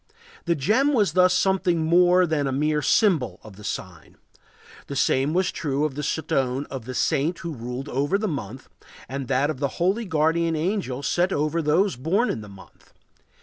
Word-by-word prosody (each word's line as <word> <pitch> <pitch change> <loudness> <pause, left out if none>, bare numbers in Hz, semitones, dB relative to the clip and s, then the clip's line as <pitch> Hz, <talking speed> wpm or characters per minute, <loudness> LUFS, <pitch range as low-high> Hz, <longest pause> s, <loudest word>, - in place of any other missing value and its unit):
The 170 - +1
gem 225 - +2
was 205 - +2
thus 185 0 +5
something 185 -3 +1
more 180 +2 +5
than 155 -4 0
a - - -1
mere 150 +3 0
symbol 145 - +2
of 105 -3 -12
the 105 - -13
sign. 90 -5 -7 0.7
The 140 - -6
same 135 +1 +2
was 185 +3 +1
true 145 -1 -1
of 150 - -2
the 150 - -4
stone 135 -3 -1
of 130 -4 -6
the 130 +1 -6
saint 160 +6 0
who 165 - -3
ruled 125 +1 -6
the 150 - -1
month 130 - -6 0.4
and 135 0 -5
that 135 +4 +1
of 130 - -8
the 140 - +1
holy 195 +7 +1
guardian 165 -1 +1
angel 155 -6 -2
set 175 +5 +1
over 155 +1 0
those 160 +1 +1
born 185 - +1
in 110 - -4
the 105 - -11
month. 100 -1 -17
150 Hz, 185 wpm, -24 LUFS, 135-180 Hz, 0.7 s, thus